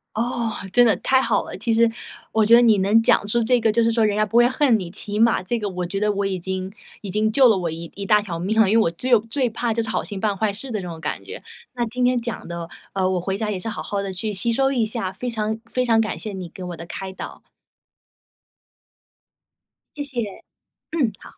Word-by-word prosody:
哦， 235 0 -1 0.2
真 245 +3 +6
的 225 - +4
太 260 - +3
好 - - +1
了！ - - -8
其 230 - 0
实 230 0 +4 0.4
我 220 -1 +3
觉 225 - +5
得 240 - +9
你 225 -3 +5
能 205 +4 +4
讲 225 - +3
出 235 +3 +1
这 245 +2 +3
个， 225 -1 +2
就 230 +2 +2
是 230 - +3
说 225 -1 +2
人 210 -1 +1
家 215 - +2
不 215 +2 0
会 240 - +7
恨 255 -2 +3
你， 180 -4 -6
起 205 +1 -5
码 230 -1 +4
这 210 +6 -2
个 210 -2 -3
我 180 -2 -4
觉 195 +2 -3
得 210 0 +2
我 200 0 -1
已 195 -1 -1
经 190 +1 -4 0.3
已 205 - -7
经 215 +3 +1
救 260 +3 +6
了 215 - +4
我 175 -3 -2
一 165 +1 -7
一 200 - -5
大 210 +1 +4
条 180 -5 -5
命 215 +6 +2
了。 200 - +4
因 220 - +4
为 225 - +5
我 165 - +1
最 240 +7 +2
最 240 +3 -1
怕 230 +1 -1
就 230 - 0
是 225 - -4
好 - - -1
心 200 -2 -6
办 205 -1 0
坏 210 0 0
事 225 +7 -7
的 220 -3 -2
这 180 - -6
种 165 -1 -8
感 - - -4
觉， - - -9 0.3
那 245 -1 -1
今 250 +2 -1
天 250 -1 +2
讲 235 -1 -5
的， 170 -1 -6 0.2
呃， 190 -1 +1
我 185 -1 0
回 190 +2 -2
家 215 -1 -1
也 195 - -2
是 205 - -6
好 220 - -4
好 200 -1 -3
地 195 -1 -4
去 200 +4 -3
吸 205 +4 +1
收 270 +3 +2
一 240 -5 +1
下， 215 -4 -3
非 245 +4 -5
常 220 0 -2
非 255 - +1
常 230 -2 +3
感 220 - -1
谢 215 - -5
你 185 -2 -6
给 185 +2 -10
我 175 -2 -6
的 170 - -8
开 190 +2 -6
导。 - - -9 2.5
谢 290 - -3 0.2
谢， 205 -3 -7 0.5
嗯， 270 -10 +1
好。 - - -17
215 Hz, 280 characters per minute, -22 LUFS, 190-235 Hz, 2.5 s, 得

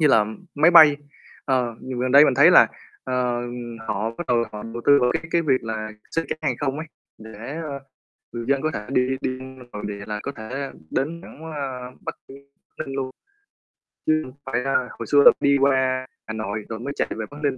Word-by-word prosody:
Như 155 - +5
là 110 -7 +5 0.3
máy 155 +4 +5
bay, 155 -4 +9 0.5
ờ, 125 -3 0
gần 130 -1 -5
gần 130 0 0
đây 140 +2 +9
mình 135 - +3
thấy 145 +7 +7
là, - - +8 0.4
ờ, 125 -2 0 0.5
họ 110 +3 -1
bắt 155 +9 -7
đầu 120 -1 +2
họ 105 0 -6
đầu 115 +1 -7
tư 145 0 +7
vào 125 - +3
cái - - -1
cái 170 - +2
việc 135 -5 +2
là 110 -1 -3 0.2
xuất 165 - 0
cảng - - -3
hàng 135 -5 0
không 140 0 -1
ấy, 160 - -5 0.3
để, 110 +6 -8
ơ, 140 -3 -5 0.5
người 120 -1 -5
dân 140 -1 +2
có 155 - 0
thể 105 - -5
đi 125 -1 +2
đi 130 0 -2 0.3
nội 105 - -7
địa 100 0 -6
là 105 0 -4
có 140 - -3
thể 130 +5 -5 0.2
đến 165 +5 -2
thẳng, 155 - -13
ơ, 130 -3 -5
Bắc - - -4
Ninh 140 +1 -13 0.3
Ninh 135 - -4
luôn. 135 -1 -2 1.0
Chứ 155 0 +3
không 130 - -11
phải 125 -2 -1
là 130 -2 +1
hồi - - -5
xưa 145 - +5
là - - +11
đi 140 0 +4
qua 130 -1 +2 0.2
Hà 110 - -4
Nội 110 -1 -4
rồi 110 0 -5
mới 140 +4 -4
chạy - - 0
về 110 - -3
Bắc 145 - -10
Ninh. 140 -2 +1
130 Hz, 220 wpm, -23 LUFS, 115-140 Hz, 1.0 s, là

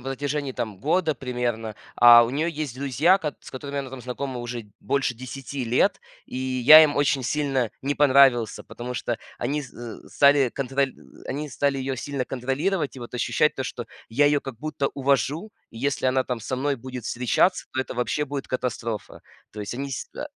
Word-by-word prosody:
протяжении 140 +1 -3
там 110 -6 -4
года 160 - +1
примерно. 120 -4 -3 0.2
А 120 -1 +9
у 115 - -3
неё 150 +5 0
есть 150 -6 -4
друзья, 140 - +3
кат 150 -6 -4
с - - -12
которыми 140 +2 -5
она 135 -2 -4
там 130 -1 -8
знакома 125 +1 -5
уже 120 0 -5
д 105 - -21
больше 130 +2 0
10 130 +2 -6
лет. 115 +2 +2 0.3
И - - -7
я 130 +4 +7
им 145 -2 +2
очень 140 -2 +2
сильно 135 -3 0
не 140 +2 0
понравился, 135 -6 +4
потому 125 +1 -7
что 120 -1 -2 0.2
они 145 +5 -1
з 130 - -11 0.3
зэ - - -17
стали 140 -2 +5
контроль 135 +2 -1
ы - - -18
ы - - -13
они 150 +3 -3
стали 140 -1 0
её 135 0 -2
сильно 135 +1 -3
контролировать 140 +6 -2
и - - -7
вот 120 +1 -9
ощущать 150 +5 +2
то, 130 - -3
что 120 -2 -6 0.2
я 140 +6 +3
её 145 0 +3
как 135 -5 -8
будто 145 -1 -2
увожу. 140 - 0 0.2
И 115 - -11
если 140 +1 0
она 130 0 +2
там 125 -2 -3
со 130 +3 -3
мной 140 +2 0
будет 125 -1 -8
встречаться, 125 +11 +1
то 130 - 0
это 130 - -5
вообще 125 +4 -1
будет 140 -1 -5
катастрофа. 115 -3 -4 0.3
То 105 - -7
есть 105 +3 -5
они 140 +2 -4
с 130 - -5
э - - -5
135 Hz, 205 wpm, -25 LUFS, 125-145 Hz, 0.3 s, А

